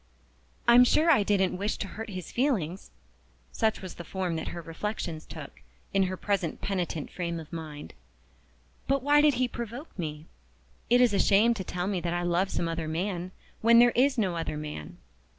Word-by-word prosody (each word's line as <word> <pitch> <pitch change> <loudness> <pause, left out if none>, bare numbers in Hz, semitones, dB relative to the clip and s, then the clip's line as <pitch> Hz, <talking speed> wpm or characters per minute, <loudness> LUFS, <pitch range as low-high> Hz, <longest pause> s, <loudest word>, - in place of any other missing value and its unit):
"I'm 240 +1 +8
sure 315 +6 +4
I 275 - +5
didn't 190 -3 +1
wish 205 +2 -1
to 195 - -4
hurt 225 +3 -7
his 185 -4 -7
feelings" 200 - -1 0.6
(such 220 -3 0
was 185 - -6
the 175 - -9
form 180 -1 -3
that 160 - -4
her 175 - -5
reflections 165 -1 -5
took, 155 -4 -10 0.3
in 195 - +3
her 185 - -4
present 195 -6 -1
penitent 175 -6 -3
frame 170 -2 -3
of 155 -1 -11
mind); 155 -3 -7 0.9
"but 275 -1 +1
why 290 +1 +5
did 295 -3 +4
he 255 +1 +1
provoke 240 - -7
me? 155 -2 -4 0.6
It 245 +1 +5
is 240 -4 +4
a 200 - +2
shame 210 +5 +5
to 205 -5 -5
tell 180 0 -3
me 195 -1 -1
that 170 0 -2
I 175 - -1
love 175 +2 +1
some 170 - -1
other 165 -1 -3
man 175 +2 -2 0.3
when 230 +1 +6
there 240 0 +7
is 270 +2 +3
no 190 -6 +1
other 155 -2 -3
man. 150 - -7
190 Hz, 190 wpm, -28 LUFS, 170-230 Hz, 0.9 s, I'm